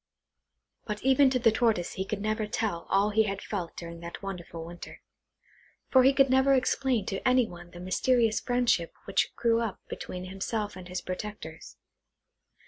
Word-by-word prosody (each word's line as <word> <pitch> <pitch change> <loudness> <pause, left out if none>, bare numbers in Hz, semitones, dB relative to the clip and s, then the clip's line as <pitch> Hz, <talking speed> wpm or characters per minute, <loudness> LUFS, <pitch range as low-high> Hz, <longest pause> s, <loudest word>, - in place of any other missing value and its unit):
But 210 -1 -4
even 265 +1 +5
to 260 - +1
the 235 -2 +4
Tortoise 220 -6 +1
he 190 - -3
could 200 0 -3
never 215 0 -1
tell 205 -6 -2
all 200 +2 +3
he 220 +1 +4
had 195 -1 -3
felt 180 -6 -5
during 170 -1 -7
that 170 +3 -8
wonderful 175 -4 -6
winter; 170 +1 -10 0.9
for 260 - +7
he 265 +2 +6
could 275 0 +4
never 265 +1 +4
explain 255 -3 +1
to 195 - -3
any 255 -1 +5
one 175 -4 -11
the 175 - -11
mysterious 225 +5 +2
friendship 245 -9 +1
which - - +1
grew 230 -1 +2
up 220 -5 -3
between 180 0 -6
himself 205 +2 -3
and 185 -1 -9
his 180 0 -4
protectors. 180 -4 -7
210 Hz, 170 wpm, -28 LUFS, 180-245 Hz, 0.9 s, for